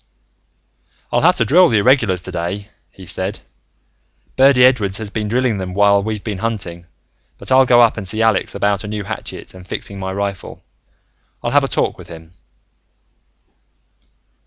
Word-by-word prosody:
"I'll - - +2
have - - +4
to - - +1
drill 180 +4 +5
the 115 - +2
Irregulars, 105 -5 +2
today," 90 +4 -5 0.2
he 95 - -14
said. 95 +3 -2 0.9
"Birdy 130 -1 +5
Edwards 105 -7 +2
has 110 -2 -6
been 110 -1 -3
drilling 120 -1 0
them 90 -1 -5
while 100 0 +4
we've 105 0 -4
been 105 -4 -5
hunting. 90 -7 -5 0.5
But - - -8
I'll 130 0 +5
go 120 -1 +6
up 115 -1 +3
and 100 -3 -5
see 110 +4 -1
Alex 110 -4 +1
about 100 0 0
a - - -7
new 105 0 -4
hatchet 100 - -7
and 90 0 -14
fixing 100 +1 -6
my 95 0 -4
rifle. 100 0 -5 0.8
I'll - - -2
have - - +4
a - - 0
talk - - -2
with - - -12
him." 80 0 -13
100 Hz, 165 wpm, -18 LUFS, 95-115 Hz, 0.9 s, go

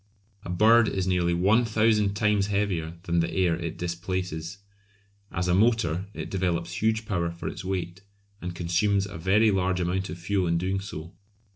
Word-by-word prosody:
A - - -8
bird 110 +5 +5
is 95 -2 -1
nearly 90 -2 +1
one 100 +7 +4
thousand 110 -2 +2
times 105 -2 +2
heavier 95 -6 -1
than 85 -2 0
the 85 0 +1
air 90 -3 +2
it 85 -1 -5
displaces. 90 0 -4 0.7
As 90 +1 -2
a 90 - +2
motor 100 -4 +2
it - - -6
develops 85 -2 -1
huge 110 0 +1
power 85 -5 -1
for 85 0 -7
its - - -6
weight, 90 -1 -4 0.4
and 90 0 -5
consumes 95 +4 +1
a 100 -4 -8
very 105 +5 +4
large 95 -1 0
amount 90 +1 -1
of 80 - -6
fuel 95 +1 0
in 85 0 +1
doing 95 +3 -1
so. 85 -3 -8
95 Hz, 175 wpm, -26 LUFS, 85-100 Hz, 0.7 s, bird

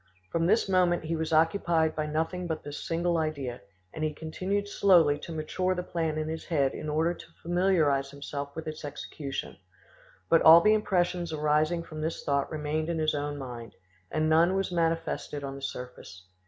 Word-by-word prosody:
From 165 0 +1
this 220 +4 +3
moment 180 -3 +2
he 165 +1 -2
was 160 0 -3
occupied 160 0 +2
by 155 0 -2
nothing 165 +4 -2
but 160 -2 -3
this 145 0 -7
single 170 0 +1
idea, 140 -7 -3 0.3
and 155 - -4
he 155 -1 -1
continued 185 +6 -2
slowly 170 -8 +4
to 170 - -8
mature 185 +4 -1
the 180 - -3
plan 165 -3 -2
in 155 0 -2
his 160 0 -5
head 140 -5 +1
in 155 - -5
order 160 +3 +1
to - - -12 0.2
familiarise 165 -6 +2
himself 140 0 -6
with 160 - -5
its 155 0 -6
execution; 145 -1 -6 0.7
but 165 - +5
all 160 +1 +10
the 215 +5 +4
impressions 180 -5 0
arising 155 +2 +1
from 155 -2 -8
this 160 +1 -3
thought 140 -1 0
remained 155 +1 -2
in 170 - -1
his 155 -1 +1
own 145 0 -3
mind, 120 -4 -8 0.3
and 155 0 0
none 165 +4 +4
was 195 -1 -1
manifested 165 -3 -1
on 135 0 -4
the 135 - -9
surface. 125 -8 -8
160 Hz, 185 wpm, -28 LUFS, 150-175 Hz, 0.7 s, all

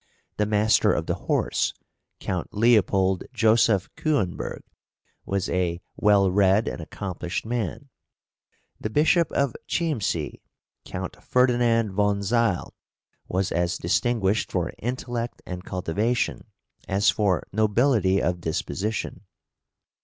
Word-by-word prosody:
The 105 - +1
Master 105 +1 +3
of - - -1
the - - 0
Horse, - - -1 0.4
Count 90 +1 -4
Leopold 100 -4 +3
Joseph 110 -4 +3
Küenberg, 110 - -1 0.7
was 100 -1 -1
a 85 -2 -1 0.2
well 100 -3 +4
read 100 +2 +3
and - - -4
accomplished 90 +2 -5
man; 120 - -3 0.9
the 110 - -3
Bishop 160 - +3
of 140 -4 0
Chiemsee, 115 - -1 0.4
Count 90 0 -6
Ferdinand 120 -3 +2
von 100 +1 +1
Zeil, 115 -2 0 0.5
was 95 +1 -1
as 85 0 0
distinguished 110 -3 0
for - - -1
intellect 120 0 -4
and 90 0 -6
cultivation 100 +7 -1 0.4
as 100 +2 +3
for 100 -4 +1
nobility 110 -2 +3
of 90 0 -1
disposition. 95 +5 -3
105 Hz, 110 wpm, -25 LUFS, 95-115 Hz, 0.9 s, well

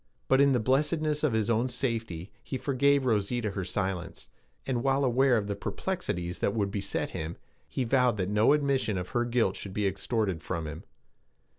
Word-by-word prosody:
But 135 +1 +5
in 140 0 +5
the 125 - +3
blessedness 150 +5 +1
of 150 -6 +2
his 110 +1 +1
own 115 +3 +1
safety 115 -8 -3
he 130 - -4
forgave 140 +1 +2
Rosita 110 -1 0
her 95 -1 -3
silence, 95 -2 -3 0.4
and, 125 -3 -1
while 135 +1 +2
aware 130 0 +4
of 105 - -1
the 100 0 -2
perplexities 90 - -3
that 100 - 0
would 100 -3 0
beset 100 -1 -2
him, 80 +2 -5 0.3
he 130 - -1
vowed 125 -2 +3
that 90 -2 -1
no 105 +6 +4
admission 135 -8 +1
of 90 0 -4
her 120 0 0
guilt 120 -5 +1
should 95 - -7
be 105 0 0
extorted 100 -3 -1
from 85 0 -3
him. 75 - -7
115 Hz, 185 wpm, -29 LUFS, 100-135 Hz, 0.4 s, But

